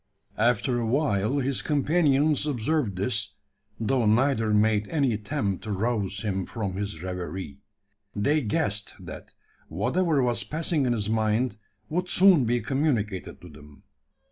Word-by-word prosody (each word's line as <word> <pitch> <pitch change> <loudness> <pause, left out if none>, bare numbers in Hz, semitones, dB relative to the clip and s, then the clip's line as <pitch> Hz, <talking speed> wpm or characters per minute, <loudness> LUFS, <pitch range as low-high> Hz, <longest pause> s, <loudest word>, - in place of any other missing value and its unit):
After 120 +2 +2
awhile 120 -1 +1
his 135 -1 0
companions 150 -1 +2
observed 130 - 0
this; 100 -2 -1 0.4
though 115 0 +1
neither 115 0 +2
made 105 0 +2
any 140 -7 +1
attempt 105 -2 -2
to 110 - -4
rouse 100 -1 -1
him 95 -3 -2
from 105 -5 -4
his 100 -4 -5
reverie. 90 -5 -5 0.6
They 145 +9 +2
guessed, 105 -3 -1
that, - - -10 0.3
whatever 145 - +1
was 120 -1 0
passing 155 -3 -1
in 120 - +2
his 105 -3 -2
mind 110 +1 0 0.3
would 180 +3 -2
soon 180 -9 +5
be 120 +1 +1
communicated 110 - -1
to 90 - -11
them. 75 -1 -16
115 Hz, 135 wpm, -26 LUFS, 100-140 Hz, 0.6 s, soon